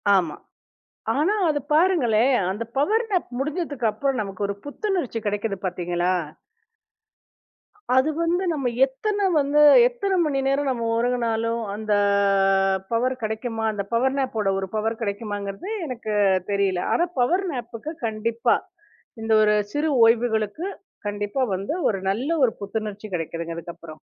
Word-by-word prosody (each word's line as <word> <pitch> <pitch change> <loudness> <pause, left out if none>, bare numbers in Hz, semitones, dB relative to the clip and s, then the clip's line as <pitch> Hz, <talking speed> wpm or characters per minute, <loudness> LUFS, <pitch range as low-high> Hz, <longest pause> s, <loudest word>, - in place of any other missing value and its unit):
ஆமா. 170 -5 +1 0.8
ஆனா 340 +9 +2
அது 290 -1 +1
பாருங்களேன். 275 - +3 0.2
அந்த 215 +4 -3
பவர் 435 - +2
நேப் 365 -3 0
முடிஞ்சதுக்கு 290 -5 -1
அப்புறம் 265 +1 -1
நமக்கு 195 0 -5
ஒரு 200 - -2
புத்துணர்ச்சி 335 - -2
கிடைக்குது 205 0 -1
பாத்தீங்களா? 175 0 -1 1.8
அது 260 +4 +4
வந்து 350 +3 +1
நம்ம 270 -5 -1 0.2
எத்தன 400 +9 -1
வந்து 290 +1 +3 0.3
எத்தன 420 -6 -2
மணி 280 -3 0
நேரம் 275 0 +1
நம்ம 230 -2 -2
ஒரங்குனாலும் 230 -1 0
அந்த 215 -1 -1 1.0
பவர் 255 +3 +1
கிடைக்குமா? 225 +1 -3
அந்த 200 -1 -3
பவர் 260 +3 +2
நேப் 260 -4 -1
ஓட 195 -1 +1
ஒரு 190 - -3
பவர் 225 +2 -1
கிடைக்குமாங்கிறது 205 - -4 0.2
எனக்குத் 210 -7 0
தெரியல. 195 -3 +1
ஆனா 345 - +3
பவர் 360 +10 +2
நேப் 240 -1 -5
க்கு 310 +2 -5
கண்டிப்பா 225 +1 +1 0.7
இந்த 225 0 0
ஒரு 210 0 +4 0.2
சிறு 300 +1 0
ஓய்வுகளுக்கு 225 - +1 0.4
கண்டிப்பா 205 +5 -2
வந்து 195 - -3
ஒரு 195 -3 -1
நல்ல 245 +9 -2 0.2
ஒரு 225 - +1
புத்துணர்ச்சி 210 0 -4
கிடைக்குது. 165 0 -4
அதுக்கு 170 +1 -7
அப்புறம். 155 -2 -12
230 Hz, 135 wpm, -24 LUFS, 205-285 Hz, 1.8 s, அது